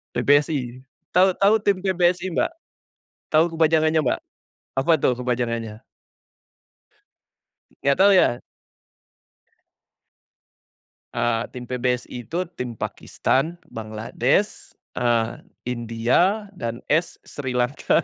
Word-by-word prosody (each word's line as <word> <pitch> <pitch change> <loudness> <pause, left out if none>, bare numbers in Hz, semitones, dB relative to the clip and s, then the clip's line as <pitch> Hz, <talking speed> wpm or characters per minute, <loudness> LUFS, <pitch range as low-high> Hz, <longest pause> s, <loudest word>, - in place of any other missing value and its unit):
PBSI, 140 -4 +1 0.3
tahu, 185 +2 +5
tahu 200 +2 +4
tim 200 -2 +3
PBSI 180 -1 +2
Mbak? 165 - 0 0.8
Tahu 155 +1 +6
kepanjangannya, 160 0 +3
Mbak? 125 - 0 0.6
Apa 165 +5 +2
tuh 125 - +2
kepanjangannya? 115 -3 -2 2.0
Enggak 140 0 +3
tahu 200 +1 +7
ya? 120 -9 +4 2.8
Eee, 120 -1 +1
Tim 125 - -6
PBSI 125 -1 -3
itu 175 +3 -1 0.2
tim 125 -2 -4
Pakistan, 155 +8 -1 0.2
Bangladesh, 110 0 -1 0.2
eee, 120 -1 +1 0.2
India, 125 - 0
dan 120 - -5
S 165 +3 +1
Sri 130 -3 -5
Lanka, 125 +6 +1
130 Hz, 95 wpm, -23 LUFS, 120-170 Hz, 2.8 s, tahu